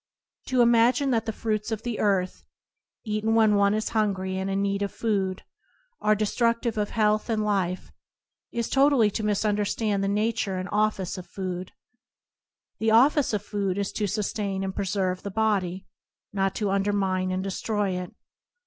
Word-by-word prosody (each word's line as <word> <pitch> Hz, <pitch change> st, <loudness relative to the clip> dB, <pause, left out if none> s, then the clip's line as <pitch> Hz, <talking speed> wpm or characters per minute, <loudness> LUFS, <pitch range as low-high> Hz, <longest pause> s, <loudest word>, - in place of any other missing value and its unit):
To 255 Hz, -2 st, +3 dB
imagine 240 Hz, +3 st, +4 dB
that 230 Hz, -2 st, 0 dB
the -, -, 0 dB
fruits 215 Hz, 0 st, -2 dB
of 220 Hz, 0 st, -3 dB
the 240 Hz, -2 st, -3 dB
earth, 190 Hz, -3 st, 0 dB, 0.6 s
eaten 215 Hz, +1 st, 0 dB
when 220 Hz, -2 st, +5 dB
one 200 Hz, 0 st, +3 dB
is 215 Hz, -, -1 dB
hungry 195 Hz, -4 st, 0 dB
and 190 Hz, +1 st, -2 dB
in 195 Hz, 0 st, 0 dB
need 200 Hz, 0 st, 0 dB
of 200 Hz, -, -1 dB
food, 195 Hz, -4 st, -1 dB, 0.6 s
are 215 Hz, 0 st, +3 dB
destruc 230 Hz, +3 st, +1 dB
tive 235 Hz, -3 st, -2 dB
of 210 Hz, -1 st, -1 dB
health 215 Hz, 0 st, +1 dB
and 215 Hz, -2 st, 0 dB
life 185 Hz, -3 st, -1 dB, 0.6 s
is 235 Hz, -1 st, -2 dB
totally 270 Hz, -6 st, +4 dB
to 220 Hz, -, -3 dB
misun 210 Hz, 0 st, +1 dB
derstand 205 Hz, 0 st, 0 dB
the 195 Hz, -, 0 dB
nature 210 Hz, -1 st, 0 dB
and 185 Hz, 0 st, -4 dB
office 205 Hz, -3 st, 0 dB
of 180 Hz, -, -10 dB
food. 185 Hz, 0 st, -5 dB, 1.1 s
The 225 Hz, -, +1 dB
office 270 Hz, +6 st, +4 dB
of 210 Hz, -2 st, -1 dB
food 200 Hz, -3 st, -2 dB
is 200 Hz, -1 st, -1 dB
to 210 Hz, -, -1 dB
sustain 200 Hz, -1 st, -2 dB
and 190 Hz, 0 st, -4 dB
preserve 185 Hz, -1 st, -1 dB
the 200 Hz, -, -5 dB
body, 195 Hz, -3 st, 0 dB, 0.5 s
not 195 Hz, -1 st, 0 dB
to 205 Hz, -3 st, -1 dB
undermine 195 Hz, -2 st, 0 dB
and 185 Hz, 0 st, -2 dB
destroy 200 Hz, +1 st, -1 dB
it. 180 Hz, -1 st, -4 dB
205 Hz, 170 wpm, -26 LUFS, 195-220 Hz, 1.1 s, when